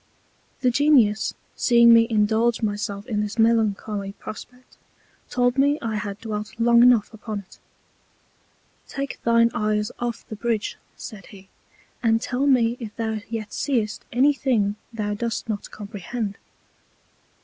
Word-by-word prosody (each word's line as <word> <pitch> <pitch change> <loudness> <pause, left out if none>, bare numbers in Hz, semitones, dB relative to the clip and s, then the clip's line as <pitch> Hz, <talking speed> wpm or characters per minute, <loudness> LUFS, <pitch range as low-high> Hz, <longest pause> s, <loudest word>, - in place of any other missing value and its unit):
The 250 - +3
Genius 240 -6 +3 0.2
seeing 235 -1 +6
me 230 0 +6
indulge 220 +2 +2
my 205 -1 +1
self 200 0 -5
in 215 -4 -1
this 210 +2 -4
melancholy 215 -3 +1
Prospect, 250 +5 -11 0.5
told 245 +1 +1
me 285 +2 +3
I 225 -2 -3
had 205 -1 -5
dwelt 215 0 -6
long 235 0 +5
enough 240 -3 +5
upon 215 -1 -5
it: 190 - -20 1.3
Take 275 0 -5
thine 230 0 +4
Eyes 210 -2 0
off 240 -1 -4
the 215 - -6
Bridge, 225 -1 -2 0.2
said 195 -4 -9
he, 190 -1 -15 0.5
and 225 -1 +3
tell 255 +4 -1
me 240 -3 +3
if 220 -4 -8
thou 220 -1 -2
yet 220 -2 -5
seest 230 -7 -1
any 275 +5 +4
thing 225 -7 0 0.2
thou 210 -3 -3
dost 230 +3 -3
not 210 -2 -4
comprehend. 205 0 -6
225 Hz, 140 wpm, -23 LUFS, 210-240 Hz, 1.3 s, seeing